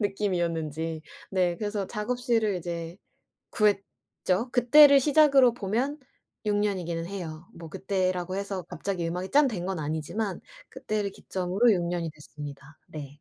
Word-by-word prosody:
느낌이었는지. 165 -6 -2 0.3
네. 180 -2 +1
그래서 205 -1 -3
작업실을 225 -2 0
이제 170 0 -5 0.6
구했죠. 205 +1 -1
그때를 280 +3 +7
시작으로 275 -3 +5
보면 245 +8 -2 0.5
6 205 -1 +1
년이기는 180 -5 -1
해요. 170 -3 -7
뭐 165 -1 -10
그때라고 185 0 -1
해서 195 -2 -3
갑자기 180 -4 -3
음악이 180 +3 -4
짠 290 0 +5
된 190 -8 -4
건 185 -3 -3
아니지만 160 +7 -3 0.3
그때를 210 -2 -3
기점으로 190 +6 +1
6 175 - 0
년이 170 -1 -2
됐습니다. 150 -1 -11
네. 145 -1 -9
190 Hz, 310 characters per minute, -27 LUFS, 170-215 Hz, 0.6 s, 그때를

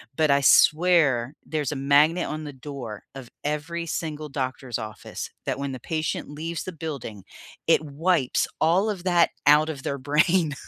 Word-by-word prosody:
but 155 +1 +2
I 140 0 +4
swear 150 -5 +4
there's 150 -4 -2
a - - -3
magnet 145 +5 +3
on 155 +1 -5
the 145 -2 -7
door 130 -6 -8
of 130 -3 -9
every 150 +3 -3
single 155 -2 -4
doctor's 130 -3 -3
office 110 -1 -7 0.2
that - - -1
when 140 -1 -3
the 130 - -6
patient 160 +5 -3
leaves 160 +3 -5
the 185 - -6
building, 140 - -7 0.4
it - - +5
wipes 155 -1 +1
all 180 +7 +3
of 190 -4 -4
that 175 -2 +3 0.2
out 150 +2 +6
of 145 -4 -5
their 140 - -3
brain. 150 +4 +2
150 Hz, 170 wpm, -25 LUFS, 135-165 Hz, 0.4 s, out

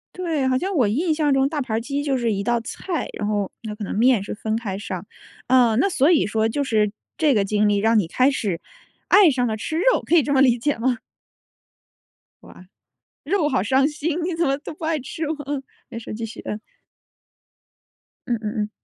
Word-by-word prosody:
对， 325 -7 -1
好 260 - +2
像 385 +7 -2
我 250 -8 +3
印 310 - +1
象 300 -2 +1
中 270 +1 +2
大 310 - -3
盘 255 -5 -2
儿 225 - 0
鸡 280 +3 -3
就 280 -2 0
是 235 -3 0
一 200 -1 -2
道 240 +2 +1
菜， 335 +8 -4
然 205 - -2
后 205 -2 -1
那 215 -2 -5
可 210 - -7
能 - - -4
面 235 -2 +4
是 - - -5
分 220 +1 -2
开 210 -4 -3
上。 185 -2 -5 0.4
哦， 245 -3 +4
那 395 - +2
所 300 -1 +3
以 320 - +3
说 220 +1 +1
就 285 +6 -1
是 215 -5 +1 0.3
这 305 -4 +3
个 210 -4 +2
经 210 +1 +1
历 205 - +2
让 220 +3 +3
你 205 - +3
开 255 +10 +3
始 200 -10 -2 0.5
爱 405 -3 +7
上 245 -2 0
了 220 -1 -2
吃 315 +9 -3
肉， - - +3
可 345 - +2
以 325 - +7
这 285 +1 -3
么 270 - +3
理 245 -3 +4
解 290 +2 0
吗？ 245 0 0 1.4
哇， 185 - -15 0.6
肉 325 -2 +1
好 190 - +1
伤 265 +6 +3
心， 310 +2 -3
你 340 0 -2
怎 335 - +1
么 275 0 +1
都 295 - -8
不 315 - -9
爱 320 -1 0
吃 310 +5 -5
哇， 315 - -2 0.5
没 230 - -7
事 225 - -8
继 225 +1 -5
续， 225 - -9
嗯。 210 - -4 1.7
嗯 240 - +1
嗯 210 -1 -4
嗯。 210 - -5
255 Hz, 235 characters per minute, -22 LUFS, 215-300 Hz, 1.7 s, 爱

